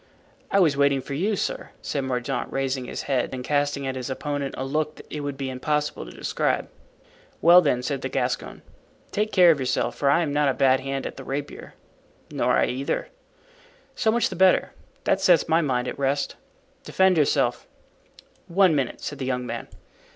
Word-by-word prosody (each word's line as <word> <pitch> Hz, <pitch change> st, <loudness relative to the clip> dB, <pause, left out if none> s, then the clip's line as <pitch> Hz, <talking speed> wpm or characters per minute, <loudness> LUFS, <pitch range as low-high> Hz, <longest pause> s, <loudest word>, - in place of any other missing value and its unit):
"I 200 Hz, -, +3 dB
was 160 Hz, -7 st, +4 dB
waiting 140 Hz, -1 st, +3 dB
for 140 Hz, -, -7 dB
you, 195 Hz, +9 st, 0 dB
sir," -, -, -3 dB
said 140 Hz, -2 st, -2 dB
Mordaunt, 125 Hz, -2 st, -2 dB
raising 135 Hz, -1 st, -2 dB
his -, -, -5 dB
head 130 Hz, -3 st, 0 dB
and 125 Hz, -, -6 dB
casting 145 Hz, 0 st, 0 dB
at 130 Hz, 0 st, -3 dB
his 130 Hz, -1 st, -5 dB
opponent 140 Hz, +1 st, -3 dB
a 130 Hz, -, -3 dB
look 150 Hz, +2 st, -2 dB
it 150 Hz, -, -4 dB
would 145 Hz, -1 st, -4 dB
be 135 Hz, -1 st, -3 dB
impossible 150 Hz, +3 st, -2 dB
to -, -, -10 dB
describe. -, -, -1 dB, 0.7 s
"Well, 175 Hz, +2 st, +8 dB
then," 125 Hz, -6 st, 0 dB
said 135 Hz, 0 st, -2 dB
the -, -, -3 dB
Gascon, -, -, -3 dB, 0.5 s
"take 210 Hz, +1 st, -1 dB
care 180 Hz, -3 st, +7 dB
of 155 Hz, -, 0 dB
yourself, 130 Hz, -1 st, -1 dB
for 140 Hz, -, +1 dB
I 155 Hz, +5 st, +4 dB
am 145 Hz, -3 st, -2 dB
not 145 Hz, -1 st, +2 dB
a 130 Hz, -, 0 dB
bad 130 Hz, -1 st, +4 dB
hand 135 Hz, 0 st, -4 dB
at -, -, -6 dB
the 135 Hz, -, -8 dB
rapier." 140 Hz, +2 st, -6 dB, 0.6 s
"Nor -, -, +1 dB
I -, -, +4 dB
either." 130 Hz, +2 st, -2 dB, 0.8 s
"So 220 Hz, -, 0 dB
much 235 Hz, +1 st, +1 dB
the 190 Hz, -, -6 dB
better; 185 Hz, +1 st, +3 dB, 0.3 s
that 190 Hz, -, +1 dB
sets 180 Hz, -4 st, +4 dB
my 165 Hz, +1 st, +3 dB
mind 125 Hz, -5 st, 0 dB
at -, -, -5 dB
rest. 140 Hz, +1 st, 0 dB, 0.5 s
Defend 190 Hz, -1 st, +3 dB
yourself." 150 Hz, -4 st, +1 dB, 0.8 s
"One 185 Hz, 0 st, +4 dB
minute," 135 Hz, -4 st, -1 dB
said -, -, -6 dB
the 130 Hz, -, -3 dB
young 125 Hz, -1 st, -1 dB
man. -, -, -5 dB
140 Hz, 190 wpm, -24 LUFS, 135-160 Hz, 0.8 s, Well